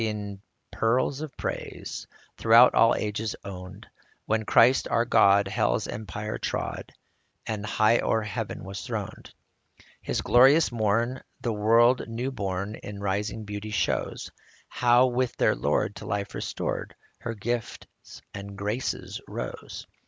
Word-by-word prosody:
in 100 -2 -5 0.3
peals 130 +5 +1
of 155 -4 -7
praise - - -5 0.3
Throughout 115 +2 +6
all 115 - +5
ages 105 +1 -2
owned, 95 +2 -8 0.4
When 110 0 0
Christ, 130 +5 +5
our 115 - +1
God, 100 -3 +5
hell's 95 - 0
empire 105 +1 -5
trod, - - -4 0.5
And 105 -2 -3
high 110 +2 +3
o'er 110 -1 +1
heaven 105 +1 -5
was 95 0 -6
throned. - - -6 0.7
This - - -1
glorious 135 +6 +5
morn 115 +3 0 0.2
the 115 - -1
world 115 +4 +4
new 120 +4 -3
born 100 -3 -3
In 105 -2 -8
rising 100 +2 -2
beauty 105 +1 -6
shows; 105 - -2 0.4
How, 120 +1 +4
with 125 -1 -1
her - - +3
Lord - - 0
to - - -8
life 100 -1 -3
restored, - - -4 0.2
Her 115 -1 -5
gifts 120 +2 -6
and 100 0 -8
graces 105 +6 -3
rose - - -6
110 Hz, 130 wpm, -27 LUFS, 100-120 Hz, 0.7 s, Throughout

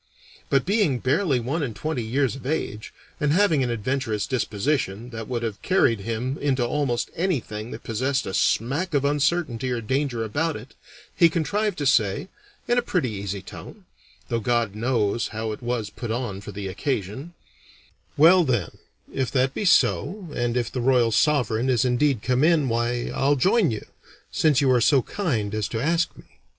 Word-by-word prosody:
But 135 -2 +2
being 200 - +2
barely 140 +2 +1
one 135 +8 -2
and 120 -7 -3
twenty 155 +3 -3
years 130 +3 0
of 135 - -10
age, 130 -6 -3 0.3
and 145 -2 +1
having 170 -6 +3
an 125 - 0
adventurous 115 -2 -1
disposition 120 -2 -1
that 115 -1 -6
would 120 -2 -3
have 105 -3 -4
carried 145 - +2
him 115 +6 -3
into 130 -4 +1
almost 125 -2 -1
anything 120 - -2
that 115 - -8
possessed 130 +5 -1
a 95 - -5
smack 145 - 0
of 140 0 +2
uncertainty 145 -3 0
or 125 -1 -1
danger 130 0 -1
about 145 +8 -1
it, - - -10 0.4
he 170 - +6
contrived 200 +5 -1
to 145 - -2
say, 130 - +2 0.4
in 240 0 +3
a - - 0
pretty 180 - -1
easy 100 -1 -5
tone - - -11 0.4
(though 115 - -1
God 115 -2 0
knows 110 -1 0
how 110 0 -4
it 105 - -7
was 120 -4 -2
put 120 +2 -7
on 110 -4 -3
for 105 - -8
the 100 0 -5
occasion): 130 - -4 0.8
"Well, 170 +5 +7
then, 120 - -1 0.3
if 135 -2 -1
that 130 0 +2
be 210 - -3
so, 185 0 +2
and 120 0 -1
if 120 -2 -1
the 125 - -3
Royal 120 -2 +3
Sovereign 125 0 +2
is 125 -1 +2
indeed 125 -1 +1
come 130 +2 +1
in, 155 -5 +3
why, 120 +1 -1
I'll 140 +2 +2
join 190 - +3
you, 110 -2 -4 0.5
since 150 -4 +3
you 135 -2 +3
are 125 -2 +3
so 135 +2 +4
kind 120 - -2
as 110 -1 -1
to 115 - -3
ask 165 +6 +1
me." - - -13
125 Hz, 180 wpm, -24 LUFS, 115-150 Hz, 0.8 s, Well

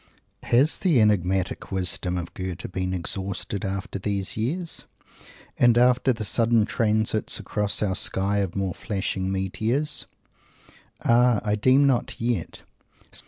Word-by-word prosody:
GOETHE - - -7
As 140 +6 +3
the 170 -9 +3
enigmatic 95 -4 +1
wisdom 90 -1 -1
of 85 -1 -6
Goethe 95 -1 -6
been 95 0 -2
exhausted 95 +2 -3
after 95 0 -4
these 100 -1 -2
years 160 +11 -3 0.7
and 120 -1 +5
after 125 +2 +4
the 110 -3 -3
sudden 115 0 +2
transits 110 -1 0
across 105 0 -1
our 95 -3 0
sky 100 +2 +1
of 95 -4 -2
more 95 -2 -1
flashing 95 -1 -3
meteors? 115 - -1 1.0
Ah! 120 -1 +4
I 105 - 0
deem 130 +6 +4
not 130 -3 0
yet. 115 -7 -2
105 Hz, 130 wpm, -24 LUFS, 95-120 Hz, 1.0 s, and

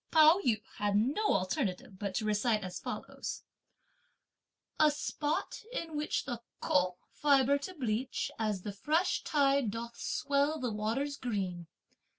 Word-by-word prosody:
Pao 315 +3 +7
yü 220 -6 +1
had 205 -1 +1
no 275 - +2
alternative 190 -2 -2
but 200 -2 -3
to 215 - 0
recite 215 0 +2
as 185 -1 -5
follows: - - -5 1.4
A 310 - +7
spot 295 +3 -2
in 335 -10 -4
which 300 0 -1
the 240 -4 -4 0.2
"Ko" 180 -1 +2
fibre 280 -1 +4
to 370 +6 -7
bleach, 245 -2 -1
as 210 -4 -1
the 205 - -4
fresh 310 - +1
tide 275 -4 +3
doth 235 +2 -6
swell 285 +2 +1
the 250 -2 -1
waters 235 +7 -1
green! 185 -8 -3
245 Hz, 140 wpm, -32 LUFS, 210-290 Hz, 1.4 s, Pao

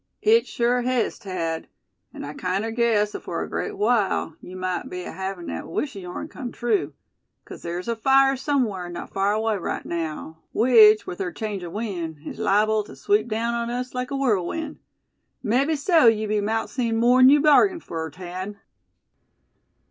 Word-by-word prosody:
"It 455 +2 +4
sure 245 +1 +1
hes, 250 -1 0
Thad; 165 -4 -4 0.4
and - - -8
I 145 - -6
kinder 190 +7 -2
guess 225 -3 +1
afore - - -4
a - - -6
great 420 -1 -4
while 220 - +1
yeou 180 - -10
might 185 -1 -3
be 180 - -5
havin' 190 -1 -5
thet 80 - -5
wish 260 - -3
o' - - -6
yeourn 180 +9 -6
kim 255 -6 -7
true; 210 - -1 0.5
'cause - - -10
ther's 175 +3 -5
a 235 - 0
fire 270 +3 +4
sumwhar 245 -10 -1
not 175 - -7
far 195 +1 +1
away 220 0 0
right 180 - -4
naow; 160 -1 -4 0.2
which, 220 -2 +6
with 180 - -7
ther 185 -2 -2
change 210 -3 -5
o' 175 - -6
wind, 175 -6 -4
is - - -7
liable 215 0 +2
tew - - -12
sweep 210 +2 +1
daown 230 +1 -1
on 235 0 -2
us 250 +1 -4
like 250 0 -3
a 275 - -3
whirlwind. 270 - -1 0.6
Mebbe 275 +8 +1
so 315 -2 +4
be 225 - +6
yeou 215 -1 -1
mout 220 +2 -1
see 240 -4 -1
more'n 245 +3 +5
yeou 295 +1 +6
bargained 320 +4 +4
fur, 160 -1 -5
Thad!" 185 +5 -7
215 Hz, 180 wpm, -24 LUFS, 185-250 Hz, 0.6 s, which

